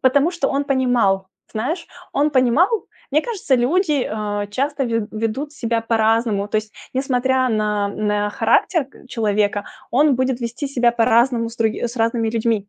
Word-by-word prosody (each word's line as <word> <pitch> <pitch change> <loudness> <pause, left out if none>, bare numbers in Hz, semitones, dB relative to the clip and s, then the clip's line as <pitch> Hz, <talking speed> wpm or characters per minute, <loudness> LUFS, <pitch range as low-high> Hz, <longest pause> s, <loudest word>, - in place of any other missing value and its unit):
потому 280 +5 +3
что 340 -6 -1
он 280 +1 0
понимал, 245 -9 +1 0.2
знаешь, 275 +11 -3 0.3
он 295 +2 +2
понимал. 290 - +2 0.2
Мне 305 +3 +2
кажется, 390 - -1
люди, 295 +2 +1
а, 205 -1 -2
часто 275 +6 -1
ве 230 -3 -1
ведут 225 +7 -3
себя 230 -5 -1
по-разному, 225 -2 +1
то 215 - -1
есть, 215 0 -3 0.2
несмотря 260 -1 +1
на, 210 -2 0
м, 210 0 -1
э, 205 0 0
характер 265 - +2
к 265 - -19
человека, 210 -3 0 0.3
он 285 +3 +4
будет 255 0 0
вести 240 +4 -4
себя 240 -3 +2
по-разному 235 0 +3
с 230 - -12
други 220 -1 0
с 235 +2 -8
разными 225 0 +1
людьми. 225 -3 0
235 Hz, 165 wpm, -20 LUFS, 220-275 Hz, 0.3 s, он